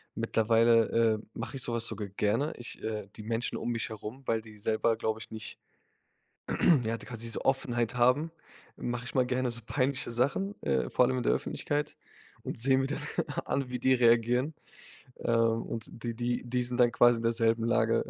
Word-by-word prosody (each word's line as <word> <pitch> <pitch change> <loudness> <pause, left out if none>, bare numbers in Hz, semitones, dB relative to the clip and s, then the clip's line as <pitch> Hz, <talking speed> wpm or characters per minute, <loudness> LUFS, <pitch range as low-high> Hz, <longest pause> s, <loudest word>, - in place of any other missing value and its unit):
mittlerweile, 115 0 +3
äh, 115 -2 +2
mache 135 - -5
ich 130 - -1
so 120 - 0
was 115 0 +1
sogar 105 -2 -3
gerne. 105 - 0
Ich, 120 - -5
äh 105 -2 -4
die 105 - -8
Menschen 115 +2 -2
um 120 - -2
mich 115 -2 -2
herum, 110 +4 -8
weil 115 -2 0
die 110 -1 -14
selber, 110 +2 +1
glaube 110 0 -2
ich 110 - -10
nicht, 110 0 -6 1.3
ja, 115 +1 -1
die - - -10
quasi 115 -1 -5
so - - -1
Offenheit 120 -3 0
haben, 125 +7 +3 0.5
mache 120 0 -3
ich - - -7
mal 130 -1 +4
gerne 125 0 0
so 120 0 -3
peinliche 135 +1 0
Sachen, 140 - 0
äh, 65 -2 0
vor 125 - +4
allem 130 0 0
in 125 - -1
der - - +3
Öffentlichkeit 150 +1 -2 0.5
und - - -5
sehe 130 +3 +4
mir 135 0 +1
dann 145 - -3 0.5
an, 135 -2 -1
wie 125 -1 -3
die 130 +1 +4
reagieren. 120 +4 +3 0.7
Ähm, 115 -1 +2
und 115 -2 -5
die 115 0 -5
die 120 +1 -1
die 125 +1 0
sind 120 0 -2
dann 120 -1 +5
quasi 120 0 +5
in 115 - -5
derselben 115 0 +2
Lage, 115 -1 +2
120 Hz, 195 wpm, -30 LUFS, 115-125 Hz, 1.3 s, dann